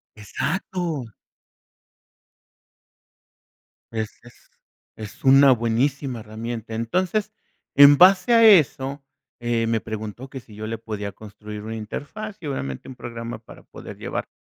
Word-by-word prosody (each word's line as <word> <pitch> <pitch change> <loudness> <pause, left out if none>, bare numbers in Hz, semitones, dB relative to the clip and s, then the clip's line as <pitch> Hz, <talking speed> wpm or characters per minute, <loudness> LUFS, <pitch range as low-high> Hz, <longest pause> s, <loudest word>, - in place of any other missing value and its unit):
Exacto. 160 - -3 2.9
Es 110 -2 -3
es 120 - -19 0.5
es 110 +4 -10
una 135 +1 +7
buenísima 125 +2 0
herramienta. 110 +1 -6
Entonces, 185 - -1 0.4
en 145 0 +9
base 190 +5 +6
a 230 0 +6
eso, 140 -8 +4 0.4
eh, 120 -1 0
me 115 -1 +1
preguntó 110 +4 -7
que 135 - -7
si 115 - -17
yo 110 +1 -6
le 115 - -3
podía 105 -2 -5
construir 105 0 -10
una 110 +1 -5
interfaz, 200 - -7
y, 155 - -6
obviamente, 70 - -4
un 130 - -9
programa 115 -1 -7
para 110 - -15
poder - - -11
llevar, - - -4
120 Hz, 125 wpm, -23 LUFS, 110-145 Hz, 2.9 s, en